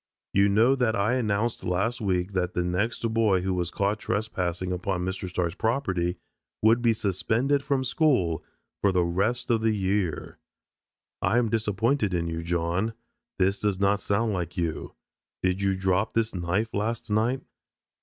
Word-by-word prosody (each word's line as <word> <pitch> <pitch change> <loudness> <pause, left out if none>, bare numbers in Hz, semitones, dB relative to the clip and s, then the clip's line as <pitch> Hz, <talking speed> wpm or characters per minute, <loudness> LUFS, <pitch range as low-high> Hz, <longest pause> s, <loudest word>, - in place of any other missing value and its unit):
You 100 +1 +4
know 110 +6 +4
that 120 -4 +1
I 110 +4 +1
announced 115 -2 0
last 100 +7 -1
week 95 -1 0
that 90 -1 -1
the 90 - +1
next 100 +7 -1
boy 105 -5 +3
who 95 +1 -1
was 90 -2 -1
caught 100 +4 0
trespassing 90 -5 -2
upon 90 0 -2
Mr. 95 0 -4
Starks' 90 -2 -1
property 95 -6 0 0.5
would 115 +2 +5
be 120 -1 +4
suspended 110 +7 0
from 140 -1 0
school 125 - +1 0.4
for 100 - +3
the 90 -1 +2
rest 100 +9 0
of 115 -1 +2
the 110 -1 +2
year. 95 -5 -1 0.8
I 120 - +2
am 120 -2 +2
disappointed 110 0 +1
in 85 -1 0
you, 85 0 -3
John. 85 +5 -1 0.4
This 95 +1 +2
does 105 -3 0
not 100 +1 +2
sound 110 +2 0
like 90 -2 -4
you. 85 -3 -3 0.5
Did 95 +1 +1
you 100 -1 +2
drop 95 +3 0
this 115 0 0
knife 95 +5 -1
last 110 +2 -2
night?" 115 +5 +1
100 Hz, 165 wpm, -26 LUFS, 90-115 Hz, 0.8 s, would